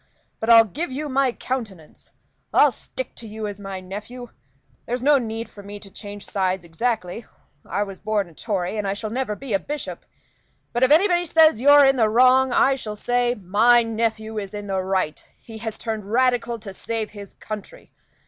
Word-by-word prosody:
But 220 - -3
I'll 230 -1 +9
give 290 - -5
you 295 +4 -4
my 270 -1 +2
countenance 220 -11 -6 0.4
I'll - - +5
stick - - -7
to 230 - -8
you 215 0 -6
as 205 -1 -5
my 195 -1 -6
nephew. 210 +6 -8 0.6
There's 245 +1 -2
no 290 0 +5
need 225 -1 -4
for 210 -2 -13
me 200 +1 -9
to 200 -1 -13
change 205 0 -9
sides 190 -2 -1
exactly. 215 +3 -2 0.4
I 205 - 0
was 195 -2 -8
born 210 -3 -1
a 170 - -17
Tory, 195 +1 -3
and 205 - -2
I 195 - -1
shall 215 +1 -5
never 240 -3 -2
be 265 -1 -6
a 195 - +3
bishop. 295 +9 -6 0.7
But 240 - -1
if 260 - +5
anybody 350 +3 +4
says 315 -6 +5
you're 285 +1 +7
in 270 0 +4
the 220 -3 +3
wrong, 255 +3 +5
I 270 +2 +4
shall 220 -5 -5
say, 245 +2 0
'My 220 +5 +4
nephew 220 -1 -2
is 200 0 -7
in 205 0 -6
the 190 -1 -1
right; 185 -4 -1 0.2
he 225 -1 -11
has 220 -1 -5
turned 215 -3 -5
Radical 245 -1 +2
to 205 -3 -9
save 220 +2 -4
his 205 -1 -11
country. 210 -2 -9
220 Hz, 195 wpm, -23 LUFS, 205-250 Hz, 0.7 s, I'll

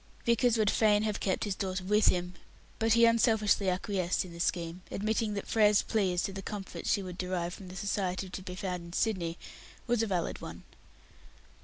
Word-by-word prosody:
Vickers 235 0 +3
would 215 -2 +3
fain 210 -1 +3
have 215 -1 -1
kept 190 - 0
his 205 -3 -1
daughter 185 -1 -3
with 210 +3 +3
him, 180 0 +1 0.5
but 225 0 +3
he 235 0 +6
unselfishly 220 -4 +3
acquiesced 185 -1 -1
in 175 - -11
the 170 - -10
scheme, 170 0 -1
admitting 215 +1 -1
that 200 - -4
Frere's 210 -2 +4
plea 205 -5 +1
as 175 - 0
to 195 - -3
the 195 - -5
comforts 195 0 -4
she 200 - +1
would 180 -1 -8
derive 180 -1 -2
from 190 - -10
the 180 - -9
society 190 -1 -2
to 190 +1 -7
be 185 -1 -7
found 180 -2 -4
in 170 0 -11
Sydney 180 -6 -1 0.5
was 240 -2 +1
a 225 - 0
valid 180 -4 -2
one. - - -8
195 Hz, 200 wpm, -30 LUFS, 180-215 Hz, 0.5 s, he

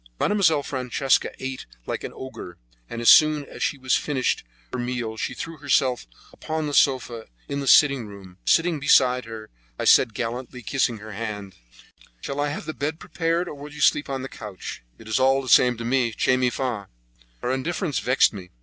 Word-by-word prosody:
Mademoiselle 165 -8 +2
Francesca 130 0 0
ate 130 0 -6 0.2
like - - -4
an - - -5
ogre, 130 -9 -9 0.3
and 115 0 -5
as - - +6
soon 155 -2 +5
as - - -11
she 145 - 0
had 130 -1 -4
finished 135 -4 +1 0.3
her 130 - -2
meal 120 -2 -3
she - - -4
threw 165 0 -7
herself 130 - +1 0.3
upon 160 0 -4
the 145 - -4
sofa 125 -5 +1 0.2
in 140 - -3
the 140 - -4
sitting 140 -5 +5
room. 95 -3 -13
Sitting 170 +1 +3
down 155 - -4
beside 125 -3 +4
her, 110 -1 -9 0.3
I - - -3
said 115 -4 +5
gallantly, 125 +2 -5
kissing 120 0 0
her 110 +1 -10
hand: 105 -2 -6 0.7
"Shall 140 - -5
I 145 0 +1
have 145 - -5
the 155 - -4
bed 155 +3 -3
prepared, 165 +1 -1
or - - -6
will 145 +1 -10
you 150 - -11
sleep 145 0 +3
on 135 -1 -3
the - - -4
couch?" 105 - -8 0.2
"It 110 - -14
is 110 - 0
all 135 +1 +4
the 135 - -7
same 125 -1 +5
to 115 - -6
me. 120 -2 +1
'Che 130 - +2
mi 130 -1 +2
fa'!" 120 -6 -3 0.6
Her 125 - 0
indifference 155 +4 -2
vexed 125 -1 +3
me. 95 -3 -9
130 Hz, 200 wpm, -24 LUFS, 115-145 Hz, 0.7 s, as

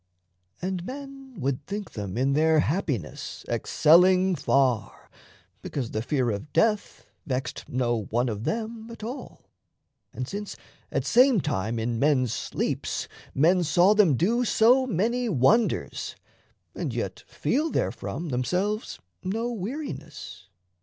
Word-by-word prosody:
And 185 -1 -2
men 270 +2 -9
would 135 0 -1
think 205 0 -5
them 100 -1 -5
in 135 +2 +2
their 155 +1 +4
happiness 140 - -3
Excelling 185 +4 +4
far, 130 -8 0 0.5
because 130 -5 -4
the 110 - -1
fear 125 -1 0
of 105 +8 -5
death 215 -2 +1 0.2
Vexed 130 -1 -3
no 120 -4 0
one 120 +3 +1
of 110 -2 -3
them 225 - -3
at 230 -2 -10
all, 250 +4 -7 0.7
and 125 +2 -5
since 205 +4 -5 0.4
At - - -1
same 250 -2 +5
time 115 - -1
in 115 0 -1
men's 130 -5 +2
sleeps - - -2 0.3
men 175 +6 +4
saw 175 +5 +5
them 200 -9 +5
do 235 - +2
So 245 +3 +4
many 235 +4 0
wonders, 200 - +1 0.6
and - - -3
yet - - -4
feel 310 +4 0
therefrom 170 -1 -2
Themselves 180 - -1 0.3
no 225 +6 -2
weariness. 165 - -6
175 Hz, 125 wpm, -26 LUFS, -, 0.7 s, same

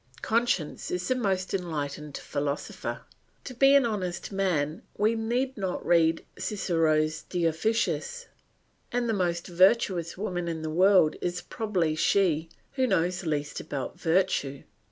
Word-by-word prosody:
Conscience 225 -8 0
is 180 0 -2
the - - +3
most 195 -7 -1
enlightened 150 -5 -3
philosopher; 145 0 -4 0.4
to 255 - -7
be 275 +3 +5
an 280 -3 +5
honest 185 -5 -3
man 170 -6 0 0.2
we 215 +2 +3
need 240 +4 -1
not 190 -3 -3
read 165 -1 +3
Cicero's 155 -6 +1
De 175 -1 -3
Officiis, 225 - 0 0.7
and 245 0 0
the 225 - +1
most 175 -3 -1
virtuous 185 -2 +2
woman 180 -3 -3
in 160 -1 -3
the 155 - -3
world 185 -1 +4
is 180 0 -2
probably 190 -9 -1
she 165 -1 +2 0.2
who 260 -1 +1
knows 180 -3 0
least 150 -1 -2
about 135 -3 -5
virtue. 160 -6 +1
180 Hz, 135 wpm, -27 LUFS, 160-215 Hz, 0.7 s, be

